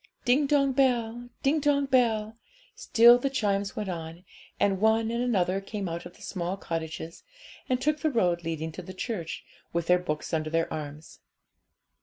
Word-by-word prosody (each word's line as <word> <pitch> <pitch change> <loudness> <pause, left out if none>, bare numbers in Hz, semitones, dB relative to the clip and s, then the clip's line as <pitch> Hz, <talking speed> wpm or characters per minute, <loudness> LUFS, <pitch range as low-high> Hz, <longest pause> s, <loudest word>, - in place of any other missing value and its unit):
Ding 270 +4 +3
dong 275 -1 +3
bell, 245 -2 +1
ding 295 +3 +3
dong 285 -1 +2
bell; 225 -5 +2 0.4
still 235 +2 +6
the 275 - 0
chimes 200 -6 -1
went 210 - -3
on, 170 0 -6 0.3
and 195 -1 +1
one 220 +1 +3
and 235 +1 -1
another 195 -5 +1
came 200 -1 -5
out 170 +1 -5
of 175 - -17
the - - -15
small 180 0 -3
cottages, 165 -2 -5 0.5
and 255 -1 +2
took 300 +3 0
the 315 - +1
road 180 - +1
leading 160 -1 -3
to 170 - -8
the 185 +1 -10
church, 185 -5 -4 0.3
with 170 -1 0
their 180 +1 +4
books 155 -3 -4
under 155 -1 0
their 165 +1 0
arms. 150 0 -7
200 Hz, 175 wpm, -28 LUFS, 170-245 Hz, 0.5 s, still